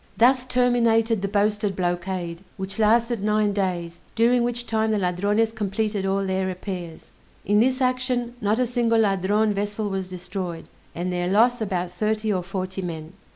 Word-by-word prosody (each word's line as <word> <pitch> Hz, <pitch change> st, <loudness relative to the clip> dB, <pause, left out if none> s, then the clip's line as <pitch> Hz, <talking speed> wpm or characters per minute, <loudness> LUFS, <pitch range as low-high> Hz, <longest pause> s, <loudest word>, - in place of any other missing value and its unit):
Thus 255 Hz, +2 st, +4 dB
terminated 235 Hz, -3 st, +2 dB
the 200 Hz, -, -1 dB
boasted 205 Hz, 0 st, 0 dB
blockade, 175 Hz, -1 st, -3 dB
which 190 Hz, +1 st, -5 dB
lasted 230 Hz, +1 st, +3 dB
nine 210 Hz, -1 st, +2 dB
days, 175 Hz, -4 st, -2 dB
during 240 Hz, +2 st, +4 dB
which 240 Hz, 0 st, -2 dB
time 220 Hz, -1 st, 0 dB
the 215 Hz, -, +1 dB
Ladrones 205 Hz, +4 st, +1 dB
completed 210 Hz, -1 st, -2 dB
all 195 Hz, 0 st, 0 dB
their 190 Hz, 0 st, 0 dB
repairs. 180 Hz, -3 st, -6 dB, 0.3 s
In 205 Hz, +1 st, +3 dB
this 260 Hz, +3 st, +2 dB
action 255 Hz, -1 st, 0 dB
not 210 Hz, +1 st, +1 dB
a 250 Hz, -, +2 dB
single 230 Hz, -2 st, +2 dB
Ladrone 205 Hz, +1 st, +2 dB
vessel 205 Hz, +1 st, -2 dB
was 190 Hz, -1 st, -3 dB
destroyed, 180 Hz, -2 st, -5 dB, 0.3 s
and 180 Hz, +2 st, -2 dB
their 175 Hz, 0 st, -1 dB
loss 230 Hz, +5 st, +3 dB
about 180 Hz, -4 st, -2 dB
thirty 215 Hz, +3 st, 0 dB
or 185 Hz, -, 0 dB
forty 185 Hz, +1 st, -4 dB
men. 165 Hz, -2 st, -6 dB
205 Hz, 160 wpm, -24 LUFS, 185-225 Hz, 0.3 s, Thus